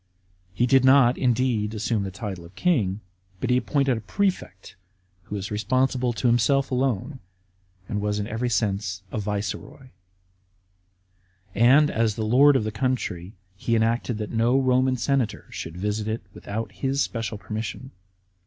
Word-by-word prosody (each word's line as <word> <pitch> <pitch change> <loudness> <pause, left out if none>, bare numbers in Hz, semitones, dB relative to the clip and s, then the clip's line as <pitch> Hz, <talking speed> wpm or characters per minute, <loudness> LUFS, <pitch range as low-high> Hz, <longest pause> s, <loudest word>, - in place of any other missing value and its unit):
He 95 +7 +1
did 130 +1 +4
not, 130 -2 +6
indeed, 120 -4 0
assume 110 0 -1
the 100 - -3
title 95 -2 -6
of 85 +3 -15
king, 110 - +1 0.4
but - - -1
he 125 - +4
appointed 135 0 +1
a - - -6
prefect, 180 - -3 0.5
who 105 - -6
was 100 0 -5
responsible 130 +3 +1
to 115 - -5
himself 120 +4 +3
alone, 130 +1 -1 0.7
and 105 -3 -2
was 105 0 -1
in 105 - -2
every 115 +3 -2
sense 100 -4 -1
a - - -2
viceroy; 105 +5 -5 1.6
and, 135 +7 +5
as 110 -2 +1
the 110 - -2
lord 135 +6 +5
of 130 - +2
the 110 - -3
country, 100 -6 -2 0.2
he 115 +4 -1
enacted 115 +1 0
that 105 -1 -5
no 120 +3 +2
Roman 130 0 +2
senator 120 -4 -1
should 80 +1 -7
visit 105 +3 -2
it 110 -1 -3
without 110 0 -5
his 135 +7 -1
special 115 -2 -4
permission. 110 +5 -6
115 Hz, 155 wpm, -25 LUFS, 105-130 Hz, 1.6 s, not